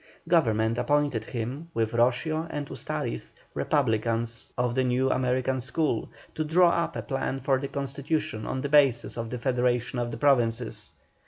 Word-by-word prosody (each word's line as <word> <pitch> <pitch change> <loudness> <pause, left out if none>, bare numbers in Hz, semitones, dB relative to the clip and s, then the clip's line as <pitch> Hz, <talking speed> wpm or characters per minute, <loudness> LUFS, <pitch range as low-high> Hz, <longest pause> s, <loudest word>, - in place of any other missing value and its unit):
Government 115 -9 +2
appointed 145 -6 +1
him, 130 +8 -5
with 110 -1 +1
Roscio 130 +7 +1
and 145 -2 -3
Ustariz, 60 - -4 0.2
republicans 115 -3 0
of 125 -1 +1
the 130 +1 +2
North 130 +1 +2
American 130 +1 0
school, 135 -1 -1 0.2
to 155 - -1
draw 170 +3 +4
up 170 - -1
a - - -3
plan 135 -1 -2
for 135 +1 +2
a 140 - -3
Constitution 140 -4 -3
on 130 - -2
the 140 - -3
basis 140 -5 +4
of 115 -1 -4
the 125 - -4
federation 125 0 0
of 120 -1 -1
the 115 - -5
Provinces. 115 - +1
125 Hz, 160 wpm, -27 LUFS, 115-145 Hz, 0.2 s, draw